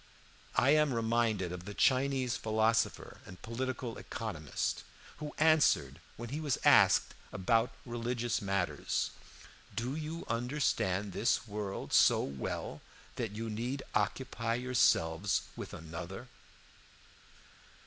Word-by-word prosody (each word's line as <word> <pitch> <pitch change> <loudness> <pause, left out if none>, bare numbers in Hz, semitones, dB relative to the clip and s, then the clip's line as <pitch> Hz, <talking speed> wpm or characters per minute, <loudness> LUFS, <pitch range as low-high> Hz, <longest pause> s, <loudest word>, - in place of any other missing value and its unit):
I 140 - +4
am 150 -4 +4
reminded 115 -5 +1
of 90 0 -7
the 105 0 -7
Chinese 130 -1 +2
philosopher 110 +1 0
and 90 0 -12
political 125 0 -4
economist, 85 -11 -3 0.3
who 150 0 -7
answered 145 - +4 0.2
when 120 0 -6
he 145 +4 -3
was 150 -5 0
asked - - +6 0.2
about 115 +6 +1
religious 120 -1 -2
matters: 100 -2 -1 0.6
'Do 125 +4 -2
you 160 +2 -5
understand 115 -6 0
this 115 +3 +1
world 105 -2 -4
so - - +6
well 70 -1 -4 0.4
that 115 -4 -3
you 115 +2 -4
need 120 +5 -3
occupy 115 +2 -1
yourselves 105 -8 +2
with - - -7
another?' 85 +8 -7
115 Hz, 110 wpm, -32 LUFS, 100-130 Hz, 0.6 s, asked